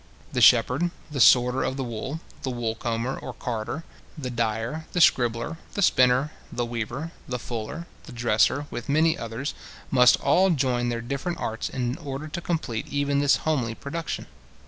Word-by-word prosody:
The 125 - 0
shepherd, 125 +9 +5 0.2
the 140 - -3
sorter 125 +1 +6
of 130 - -1
the 135 - -1
wool, 130 +6 -5 0.2
the 135 - -2
wool 120 -3 -2
comber 115 +3 -2
or - - -7
carder, 120 +6 -4 0.3
the 130 -4 -4
dyer, 115 +6 -2
the 180 - +1
scribbler, 120 -1 +3 0.2
the 200 - +1
spinner, 130 -1 +4 0.2
the 120 - -1
weaver, 120 +7 -4 0.2
the 125 - -2
fuller, 120 +7 -5 0.2
the 150 - -10
dresser, 120 +4 +2
with 120 - -6
many 160 +3 +4
others, 115 +5 -4 0.4
must 125 -2 +6
all 190 +1 +4
join 125 -6 +1
their 120 -1 -2
different 140 +8 -3
arts 110 0 -3
in 125 +4 -2
order 145 -1 -5
to 155 +3 -5
complete 155 -11 -2
even 145 0 0
this 145 0 +4
homely 130 -8 0
production. 160 +5 -4
125 Hz, 170 wpm, -25 LUFS, 120-150 Hz, 0.4 s, sorter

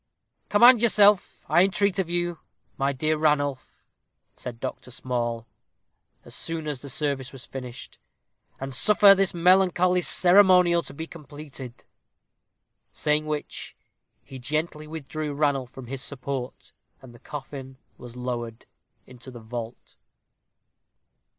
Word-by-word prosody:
"Command 235 +3 +7
yourself, 210 -4 +3
I 175 - +5
entreat 195 0 +1
of 180 -3 -1
you, 175 -1 -2 0.4
my 135 +1 0
dear 155 +3 0
Sir 155 - -3
Ranulph," 145 -3 0 0.5
said 120 -2 -8
Dr. - - -6
Small, 120 -2 -3 0.8
as - - -11
soon 165 -2 -4
as 145 -4 -4
the 140 - -8
service 135 -1 -2
was 135 -2 -11
finished, 125 -2 -9 0.6
"and 135 0 -5
suffer 200 +6 +7
this 195 -2 +1
melancholy 180 0 +4
ceremonial 180 -2 +5
to - - -10
be 160 - -5
completed." 145 -6 -10 1.1
Saying 150 0 0
which, 150 -1 -5 0.5
he 135 - -10
gently 155 +4 -3
withdrew 155 -1 -5
Ranulph 140 -4 0
from 130 0 -10
his 130 +2 -5
support, 135 -2 -5 0.3
and 130 -2 -14
the 120 - -16
coffin 135 -1 -8 0.2
was 120 -1 -11
lowered 120 -2 -5 0.4
into 125 +1 -13
the 125 -2 -10
vault. 115 +1 -8
145 Hz, 125 wpm, -25 LUFS, 130-175 Hz, 1.1 s, Command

